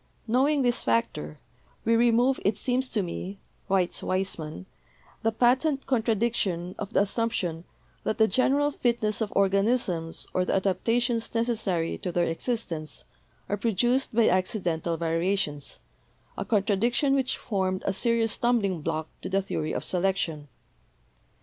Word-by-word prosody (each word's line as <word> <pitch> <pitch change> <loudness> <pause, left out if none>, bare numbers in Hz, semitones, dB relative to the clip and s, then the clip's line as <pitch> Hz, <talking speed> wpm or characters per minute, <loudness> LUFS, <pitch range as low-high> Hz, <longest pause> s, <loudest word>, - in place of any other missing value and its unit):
Knowing 270 +5 +2
this 245 -1 +2
factor, 115 -10 -1 0.5
"we 230 - +4
remove, 240 +3 +3
it 200 +1 +1
seems 255 +1 0
to 210 -4 0
me," 185 +2 -5 0.3
writes 185 -2 +1
Weismann, 165 - -2 0.6
"the 225 - +2
patent 260 +5 +2
contradiction 220 -7 0
of 205 0 -5
the - - +3
assumption 195 -6 -1 0.4
that 215 - -1
the 220 -1 +5
general 275 +7 +3
fitness 235 -5 0
of 215 - -1
organisms 195 -4 +1
or 185 - +2
the - - 0
adaptations 230 +6 0
necessary 215 -8 0
to 180 - -3
their 175 0 +1
existence 165 - -3 0.4
are 205 - -1
produced 240 +4 +1
by 230 -1 +5
accidental 175 -3 0
variations 165 -2 -1 0.3
— - - -36
a 195 - -4
contradiction 230 +7 +2
which 265 -2 +1
formed 190 -3 -2
a - - +1
serious 230 +1 +1
stumbling 205 -9 +1
block 155 +1 -2
to - - -5
the 195 0 +1
theory 155 -5 -3
of - - -3
selection. 175 -5 -1
205 Hz, 135 wpm, -27 LUFS, 180-235 Hz, 0.6 s, the